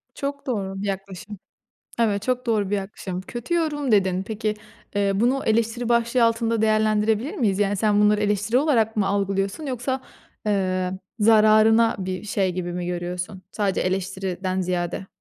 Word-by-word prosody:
Çok 280 +1 -4
doğru 195 -5 -3
bir 205 - -3
yaklaşım. 195 +1 -6 0.6
Evet, 205 -3 +1
çok 250 +1 -1
doğru 210 -4 +1
bir 205 - +2
yaklaşım. 190 -2 -5
Kötü 240 - -4
yorum 295 -6 0
dedin. 190 -2 +3
Peki, 215 +1 -2 0.4
eee, 200 -1 +2
bunu 245 +7 +1
eleştiri 230 +2 +1
başlığı 235 0 +3
altında 230 -1 +1
değerlendirebilir 215 +3 +2
miyiz? 205 -5 +1
Yani, 205 0 +1
sen 210 0 +2
bunları 210 0 +4
eleştiri 210 +3 +1
olarak 230 -7 +2
mı 200 - +2
algılıyorsun 195 +6 -1
yoksa, 260 0 -2 0.5
eee, 185 -2 0 0.3
zararına 220 +1 +5
bir 185 -1 -4
şey 195 -3 0
gibi 175 -1 -4
mi 175 0 -4
görüyorsun? 180 +2 -4
Sadece 200 -3 -1
eleştiriden 185 0 -2
ziyade. 180 0 -2
210 Hz, 150 wpm, -23 LUFS, 190-230 Hz, 0.6 s, zararına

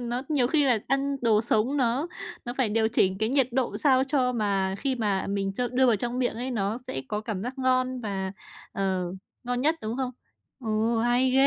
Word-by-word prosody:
nó 245 +1 -2
nhiều 275 -5 +2
khi 295 +1 +3
là 245 -5 +3
ăn 275 +1 +1
đồ 220 -2 +4
sống 235 +5 +1
nó 260 +4 +1 0.4
nó 240 +1 -4
phải 245 -5 +3
điều 220 +1 +2
chỉnh 190 -4 +2
cái 220 +1 +1
nhiệt 265 -1 +2
độ 260 -1 0
sao 265 -3 +4
cho 260 -3 +1
mà 195 -4 0
khi 270 -2 0
mà 205 -5 0
mình 195 -1 -1
cho 245 -1 0
đưa 255 +1 +3
vào 235 -4 +4
trong 240 +4 -3
miệng 245 -3 0
ấy, 250 +3 -3
nó 215 -1 -1
sẽ 135 - -4
có 210 - -2
cảm 215 -3 -4
giác 255 +3 -5
ngon 255 0 +1
và, 195 -3 -3 0.4
ờ, 190 -2 0 0.4
ngon 245 0 -1
nhất, 310 +4 +3
đúng 220 +3 -3
không? 260 -2 -1 0.5
Ừ, 225 -1 0
hay 245 +2 +3
ghê. 270 +1 +5
240 Hz, 220 wpm, -27 LUFS, 215-260 Hz, 0.5 s, ghê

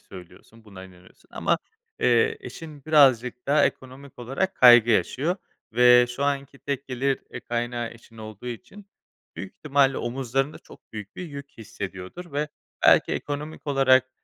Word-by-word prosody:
söylüyorsun, 95 +5 -15
buna 95 -3 -11
inanıyorsun 90 -1 -19
ama, - - 0 0.4
eee, 450 0 +3
eşin 155 -4 -10
birazcık 130 -5 +3
daha 145 +2 +4
ekonomik 130 +1 -5
olarak 135 +11 -2
kaygı 120 -2 +7
yaşıyor 155 - +1 0.4
ve 125 +1 +6
şu 130 +3 -3
anki 140 -1 -2
tek 140 -1 -4
gelir, 135 +1 -1
eee, 120 - -6
kaynağı 120 0 -3
eşin 115 0 -17
olduğu 110 +2 -10
için 195 - -9 0.5
büyük 95 - -8
ihtimalle 140 -2 +2
omuzlarında 135 +3 -2
çok - - -19
büyük 105 -2 -9
bir 180 - -6
yük 140 -3 -10
hissediyordur 100 - -8
ve 150 +2 -1 0.4
belki - - +5
ekonomik 150 +2 -5
olarak, 130 -2 +3
130 Hz, 145 wpm, -25 LUFS, 115-140 Hz, 0.5 s, kaygı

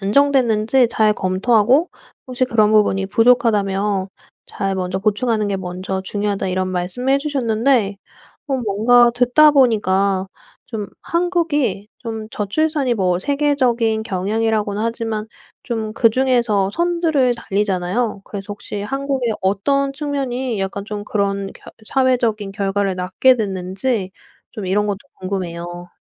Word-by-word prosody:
안정됐는지 245 +1 +3
잘 215 -2 +2
검토하고 215 - +2 0.4
혹시 255 0 -1
그런 215 -4 +3
부분이 200 -2 +3
부족하다면 205 -4 +2 0.4
잘 195 -1 -3
먼저 185 0 -2
보충하는 215 +1 0
게 195 - -1
먼저 185 +1 -4
중요하다 200 0 -2
이런 185 0 -1
말씀을 185 +9 -1
해 275 - +4
주셨는데 240 -6 +1 0.5
어 275 -2 0
뭔가 235 +4 +4
듣다 250 +5 +5
보니까 200 -8 +2 0.4
좀 220 -4 -5 0.2
한국이 325 - 0
좀 225 -2 -6
저출산이 275 +5 0
뭐 180 -4 +1
세계적인 255 -5 +1
경향이라고는 210 +1 -1
하지만 225 -2 -2 0.4
좀 220 -3 -3
그중에서 235 -4 +2
선두를 330 -6 +1
달리잖아요. 200 0 -1
그래서 200 -2 -7
혹시 205 0 -6
한국의 270 0 -2
어떤 275 +9 +1
측면이 265 -5 -3
약간 195 +1 -3
좀 210 -1 -5
그런 200 -2 -1
결 - - -19 0.2
사회적인 240 -6 +1
결과를 195 0 -1
낳게 190 +8 +3
됐는지 190 +1 -2 0.4
좀 210 - -6
이런 205 +3 +1
것도 200 -1 -2 0.2
궁금해요. 175 -2 -5
215 Hz, 300 characters per minute, -19 LUFS, 195-255 Hz, 0.5 s, 듣다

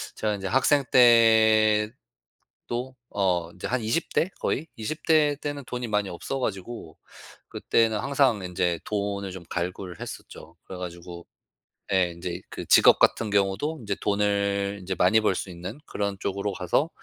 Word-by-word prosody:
제가 105 -1 -1
이제 95 -1 -5
학생 135 +6 +3
때도 115 +2 +2 0.2
어 90 -4 0
이제 90 - -6
한 125 +2 -1
20 115 +10 -2
대 180 - +2
거의 160 +4 -2
20 155 +8 -5
대 155 -3 +4
때는 145 -1 -4
돈이 125 -2 -4
많이 105 -2 0
없어 135 +10 -5
가지고 100 -6 -5 0.5
그때는 110 -2 +1
항상 135 -5 +2
인제 90 -2 -1
돈을 100 -2 -3
좀 90 -2 -9
갈구를 90 0 -4
했었죠. 80 +2 -9
그래 95 - -8
가지고 85 -1 -8 0.7
예 90 -2 +2
인제 85 +1 -6
그 - - -7
직업 - - +6
같은 110 -2 +3
경우도 100 +11 0
인제 100 -2 -3
돈을 100 -1 0
이제 95 +1 -3
많이 100 +5 +4
벌 105 - +2
수 95 - -4
있는 90 +7 -7
그런 100 -1 -3
쪽으로 100 +1 -2
가서 95 - 0
100 Hz, 275 characters per minute, -26 LUFS, 95-120 Hz, 0.7 s, 직업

